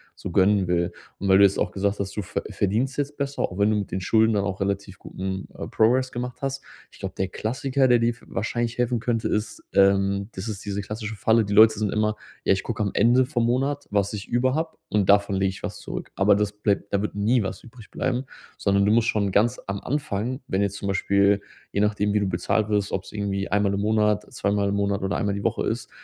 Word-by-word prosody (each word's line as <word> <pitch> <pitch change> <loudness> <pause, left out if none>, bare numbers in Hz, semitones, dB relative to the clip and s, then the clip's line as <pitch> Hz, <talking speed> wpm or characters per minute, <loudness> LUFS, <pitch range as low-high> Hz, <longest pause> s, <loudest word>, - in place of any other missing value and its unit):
so - - -7
gönnen 95 +1 +3
will?“ 85 0 +1 0.3
Und 100 - -2
weil 95 - +7
du 100 - +7
jetzt 100 -1 +4
auch - - 0
gesagt 100 +1 -1
hast, 100 0 -4
du 105 - 0
ver 90 - -4
verdienst 115 +8 -1
jetzt 145 0 -2
besser, 140 0 -2
auch 90 - -3
wenn 100 +1 +3
du - - +2
mit 100 - -4
den 95 - -2
Schulden 110 +3 +3
dann 100 - +1
auch 100 -1 -3
relativ 100 0 -3
guten, 95 0 -5
äh, - - -5
Progress 125 +4 +2
gemacht 125 0 -5
hast. 135 0 -3 0.3
Ich - - -18
glaube, - - -5
der 95 - 0
Klassiker, 130 +6 0
der 120 -1 +5
dir 115 0 +2
f 120 -1 -6
wahrscheinlich 115 +3 -2
helfen 125 -1 +1
könnte, 115 -1 -1
ist, 105 +1 -2
ähm, 100 +1 +3
das 95 +4 -6
ist 105 -2 -5
diese 100 0 -2
klassische 105 +1 -5
Falle, 110 +2 +3
die 100 - -3
Leute 110 0 +7
sind 105 -2 0
immer: 105 0 +1 0.3
„Ja, - - +4
ich 95 - -1
gucke 110 -2 -2
am 100 - -1
Ende 125 +2 +4
vom 120 -4 0
Monat, 135 +4 0
was 100 0 0
ich 105 -1 -6
über 125 +2 +1
habe 160 +2 -2
und 100 -2 +1
davon 100 -1 +4
lege 95 0 +1
ich 95 - -9
was - - -5
zurück.“ - - -7
Aber 100 +1 +4
das 105 0 0
bleibt 105 -1 -1
da 100 - +2
wird 105 - -3
nie 110 +4 +2
was 95 -2 -5
übrig 115 -2 -14
bleiben, 125 +2 -2 0.3
sondern 100 0 +2
du 105 - +3
musst 115 +1 +3
schon 100 -2 +1
ganz 120 +6 +2
am 100 0 -3
Anfang, 130 -2 -2
wenn 95 +1 0
jetzt 100 -1 0
zum 100 - -5
Beispiel, 100 +1 +2 0.3
je - - -1
nachdem, 105 -1 +1
wie 105 - +3
du 100 - 0
bezahlt 100 +4 0
wirst, 105 -1 0
ob's 95 - -4
irgendwie 100 -2 -2
einmal 100 0 +2
im 100 - -1
Monat, 105 -1 +1
zweimal 100 0 0
im 100 - 0
Monat 100 -1 0
oder 95 +1 -1
einmal 100 -2 0
die 100 - -4
Woche - - 0
ist, - - -3
105 Hz, 245 wpm, -24 LUFS, 100-115 Hz, 0.3 s, weil